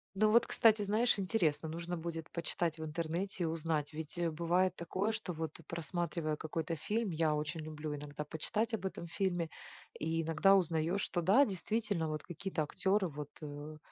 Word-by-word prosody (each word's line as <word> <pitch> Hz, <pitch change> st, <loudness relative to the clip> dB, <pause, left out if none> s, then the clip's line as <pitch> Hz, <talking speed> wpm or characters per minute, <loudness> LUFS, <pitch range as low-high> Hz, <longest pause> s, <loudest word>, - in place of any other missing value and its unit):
Ну 215 Hz, +2 st, +4 dB
вот, 230 Hz, +2 st, +6 dB
кстати, 220 Hz, -2 st, +5 dB
знаешь, 215 Hz, +4 st, +3 dB
интересно. 165 Hz, -6 st, +1 dB
Нужно 170 Hz, +2 st, -3 dB
будет 165 Hz, -1 st, -5 dB
почитать 170 Hz, -1 st, -1 dB
в 160 Hz, -, -5 dB
интернете 170 Hz, +4 st, -2 dB
и -, -, +2 dB
узнать. 160 Hz, -2 st, -1 dB
Ведь, 155 Hz, +1 st, -5 dB
э, 170 Hz, -1 st, +1 dB
бывает 170 Hz, +3 st, +2 dB
такое, 190 Hz, +5 st, -1 dB
что 215 Hz, -4 st, -3 dB
вот, 160 Hz, -2 st, -4 dB
просматривая 170 Hz, -1 st, -1 dB
какой-то 165 Hz, +2 st, -3 dB
фильм- 210 Hz, +6 st, -1 dB
я 160 Hz, -1 st, +2 dB
очень 150 Hz, +2 st, -2 dB
люблю 155 Hz, -1 st, -4 dB
иногда 145 Hz, +1 st, -6 dB
почитать 215 Hz, +10 st, -1 dB
об 220 Hz, -, -2 dB
этом 180 Hz, -2 st, -4 dB
фильме- 175 Hz, -2 st, 0 dB, 0.5 s
и 160 Hz, +2 st, 0 dB
иногда 165 Hz, +5 st, +5 dB
узнаешь, 175 Hz, +1 st, +2 dB
что 175 Hz, -, -1 dB
да, 210 Hz, +12 st, +6 dB
действительно, 205 Hz, -, -1 dB
вот 155 Hz, -1 st, -3 dB
какие-то 180 Hz, 0 st, -3 dB
актеры 190 Hz, +6 st, +1 dB
вот, 145 Hz, -2 st, -6 dB
э, 150 Hz, +1 st, -7 dB
170 Hz, 170 wpm, -34 LUFS, 155-190 Hz, 0.5 s, вот